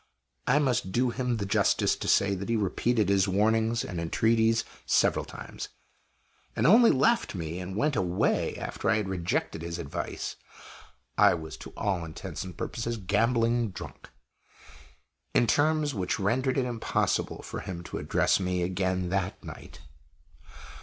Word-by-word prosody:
I - - +4
must 130 -10 +1
do 125 +3 +1
him 125 -1 -1
the 100 - -2
justice 100 - +2
to - - -5
say 100 0 +3
that 100 +3 -5
he 115 - +2
repeated 110 +1 +1
his 100 0 +3
warnings 110 +4 +2
and 90 -4 -4
entreaties 115 +6 +2 0.2
several - - +2
times, - - -8 0.9
and - - +1
only 230 +7 +7
left 230 - +2
me 85 0 -4
and 90 +1 -6
went 145 +6 +1
away 90 -3 +1
after - - -3
I 110 - +4
had 105 -3 -1
rejected 90 -3 -2
his 85 0 -4
advice 70 - -5 0.8
(I - - +6
was 80 -2 -7
to - - -11
all 95 -4 -1
intents 80 -1 -6
and 90 -3 -9
purposes 115 0 -3
gambling 115 +3 +1
drunk) 90 - -10 1.3
in - - +5
terms 150 +2 +2
which 95 -5 -2
rendered 125 +7 +1
it 130 - +2
impossible 120 -2 -1
for - - -6
him 85 -2 -6
to - - -5
address - - +2
me 90 -1 -1
again 95 0 -1
that 95 0 -2
night. - - -10
105 Hz, 155 wpm, -28 LUFS, 90-120 Hz, 1.3 s, only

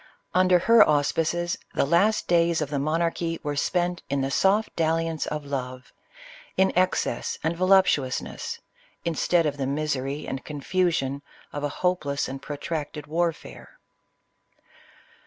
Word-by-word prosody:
Under 185 0 +5
her 225 +5 +6
auspices, 165 +4 +1 0.2
the - - +2
last 190 +9 +2
days 170 -1 +3
of 150 -2 -3
the 140 - 0
monarchy 165 +2 -1
were 145 -1 -2
spent 175 +4 0
in 140 0 0
the 135 +1 -1
soft 205 +7 +2
dalliance 165 -1 0
of 150 -1 -4
love, 130 -2 -5 0.6
in 190 0 +3
excess 185 +1 0
and 160 +2 0
voluptuousness, 185 -8 +1 0.4
instead 170 +1 +2
of 145 -1 -1
the 135 -2 -2
misery 140 -1 -2
and 135 -1 -4
confusion 145 -2 -1 0.3
of 145 - -4
a 145 - 0
hopeless 150 -4 -1
and 135 +1 -6
protracted 150 +1 -5
warfare. 165 +1 -3
160 Hz, 130 wpm, -25 LUFS, 140-175 Hz, 0.6 s, her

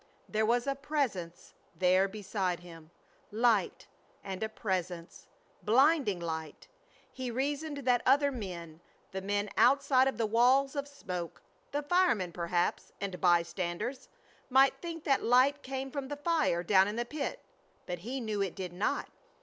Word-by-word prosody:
There 215 0 0
was 240 +1 +2
a 275 - +1
Presence 260 - -3 0.2
there 185 +1 +3
beside 190 -3 -3
him. 165 -3 -13 0.4
Light, 220 -3 +1 0.4
and 190 -1 -6
a 220 - -1
Presence! 180 -5 -4 0.3
Blinding 250 - +3
light. 160 -3 -5 0.5
He 260 -1 -4
reasoned 285 +3 -3
that 245 -1 +3
other 280 +2 +4
men, 175 - -7 0.3
the 190 - -4
men 205 +1 -1
outside 270 -1 +4
of 265 - -1
the 230 - +1
walls 255 +6 +3
of 280 0 -2
smoke, 180 -12 -6 0.3
the 290 +1 -2
firemen 290 - +2
perhaps, 175 +1 -1
and 190 -3 -5
by 175 -2 +5
standers, 180 +9 -4 0.4
might 270 +1 +5
think 330 -2 -6
that 275 -3 +2
light 260 +4 +4
came 265 0 -5
from 280 -1 -4
the 290 +1 -5
fire 295 - +1
down 190 +1 +5
in 210 - -3
the 240 +1 -1
pit, 285 +3 -4 0.5
but 175 -1 -4
he 245 +9 -4
knew 215 -4 -2
it 195 -3 -2
did 185 -3 -5
not. 185 +4 -1
220 Hz, 155 wpm, -31 LUFS, 180-270 Hz, 0.5 s, by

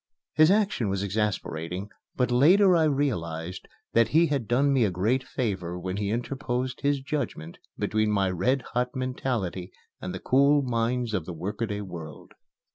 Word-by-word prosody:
His 155 +1 +5
action 195 - +2
was 95 0 -1
exasperating, 100 -2 -2 0.2
but 125 -1 +1
later 180 +9 +6
I 160 -2 +4
realized 95 - -2 0.3
that 115 0 +4
he 165 +3 +4
had 140 -8 -1
done 140 +4 +3
me 130 -3 +3
a 105 - +2
great 110 +9 0
favor 95 -9 -3
when 90 +2 -4
he 100 -1 -1
interposed 125 +2 -3
his 140 -1 +1
judgment 135 - -4 0.2
between 110 0 0
my 100 -3 +1
red 125 +9 +1
hot 125 0 -1
mentality 120 -8 -3 0.3
and 90 - -4
the 95 - -5
cool 140 +2 +4
minds 120 -1 -1
of 90 -6 -1
the 90 - -5
workaday 105 +5 -3
world. 85 -5 -9
115 Hz, 160 wpm, -27 LUFS, 95-135 Hz, 0.3 s, later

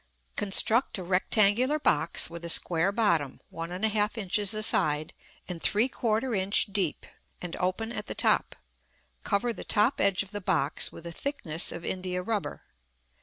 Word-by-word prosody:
Construct 215 +5 +3
a 185 - -6
rectangular 210 - +1
box, 170 - +2
with 170 0 -10
a 170 - -5
square 170 +3 +3
bottom, 170 - 0
1 165 0 -6
1/2 210 +4 -1
inches 205 0 +1
a 215 - 0
side 155 -6 +2 0.3
and 175 -3 -7
3/4 230 +1 0
inch 195 +1 +2
deep, 190 -6 -2 0.3
and 175 -1 -6
open 185 +5 -2
at - - -6
the - - -5
top. - - +1 0.7
Cover 230 +3 -1
the - - -9
top 215 +5 +1
edge 195 0 +1
of 195 - -10
the 205 -1 -6
box 145 -5 +2
with 165 - -13
a 170 - -6
thickness 170 - 0
of 170 0 -8
india 180 -1 -4
rubber. 210 0 -4
195 Hz, 160 wpm, -27 LUFS, 170-215 Hz, 0.7 s, Construct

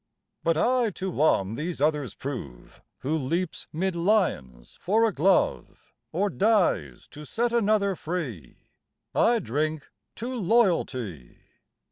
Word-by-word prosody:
But 165 -1 +2
I 245 +4 +2
to 190 0 -3
one 110 - +2
these 160 +7 -4
others 150 -2 0
prove, 75 - -7 0.2
Who 150 +4 -1
leaps 160 +5 -2
'mid 185 +3 -1
lions 170 - 0
for 220 +5 +3
a 220 - 0
glove, 180 +6 0 0.2
Or 195 +5 +1
dies 185 - +1
to 150 - -10
set 235 +9 -1
another 210 -4 +2
free 145 - -5 0.6
I 235 +1 +4
drink 155 - -2 0.2
to 245 +4 -5
Loyalty. 170 - 0
170 Hz, 120 wpm, -26 LUFS, 135-205 Hz, 0.6 s, I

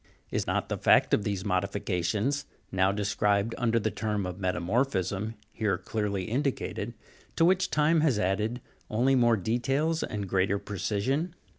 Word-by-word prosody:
Is - - -1
not - - 0
the - - -3
fact - - +4
of 105 - +3
the 100 -2 0
modifications, 100 +6 -1 0.2
now 95 0 +3
described 105 +1 +1
under 115 -2 +2
the 110 0 -1
term 105 0 -2
of 90 +1 -5
metamor 95 +5 +1
phism, 105 -2 -2 0.2
here 110 -3 0
clearly 105 -3 -2
indicated 120 -2 -2 0.4
to 165 - +4
which 185 +1 +3
time 155 +2 +3
has 145 -8 +3
added 105 +5 0 0.3
only 125 +5 +2
more 120 -3 +4
details 135 - 0
and 100 -2 -3
greater 95 +1 +1
precision 105 - -2
105 Hz, 150 wpm, -28 LUFS, 100-125 Hz, 0.4 s, fact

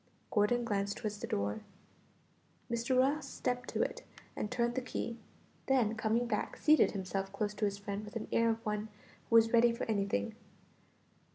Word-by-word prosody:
Gordon 230 +3 +3
glanced 200 -2 -1
toward 215 -3 -3
the 205 - -6
door. 100 +1 -1 1.1
Mr. 235 +2 +1
Ross 280 +4 +2
stepped 245 0 -2
to - - +1
it - - -4 0.3
and 210 - -2
turned 240 0 0
the 260 - -1
key; 235 -2 -4 0.5
then 250 -5 +3
coming 225 +2 +1
back, 240 - -2
seated 310 0 +5
himself 195 0 -3
close 205 +1 -2
to 210 - -1
his 200 -1 -1
friend 200 0 -4
with 210 +1 -10
the 225 - -3
air 230 0 +3
of 225 0 -2
one 210 0 -1 0.4
who 230 - +7
is 225 +1 +4
ready 235 0 +6
for 235 - -4
anything. 200 - -1
220 Hz, 175 wpm, -33 LUFS, 205-240 Hz, 1.1 s, who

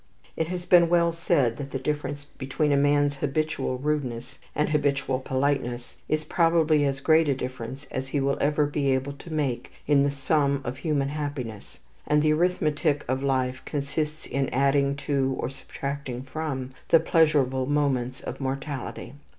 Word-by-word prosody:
It 160 - -1
has 175 0 -4
been 175 -2 +6
well 170 -1 +4
said 140 -8 +1
that 140 -1 -5
the 135 - -3
difference 145 0 -3
between 145 +2 -2
a - - +4
man's 145 0 +3
habitual 145 -1 -1
rudeness 130 -4 -3 0.2
and 150 - +1
habitual 140 -3 +1
politeness 130 -2 -1
is 155 0 +1
probably 160 -2 +3
as 135 -1 0
great 160 +1 +4
a 140 - +2
difference 130 +2 -6
as 130 0 -3
he 140 +2 -1
will 140 0 +1
ever 150 +1 +2
be 145 -1 0
able 135 +2 -3
to 150 +4 -12
make 145 -6 -2
in 145 -1 +4
the 140 - +3
sum 140 0 +1
of 125 +2 -4
human 140 -2 0
happiness; 140 - -5 0.3
and 150 0 +3
the 155 0 +4
arithmetic 155 -3 +1
of 130 +2 0
life 130 -2 0
consists 150 +1 -3
in 135 -1 -1
adding 140 +1 +2
to, 135 -2 0
or 125 - -2
subtracting 135 -2 -5
from, 135 -2 -4 0.2
the 165 - +7
pleasurable 145 -6 +2
moments 135 -3 0
of - - -6
mortality. 135 -2 -4
140 Hz, 165 wpm, -26 LUFS, 130-150 Hz, 0.3 s, the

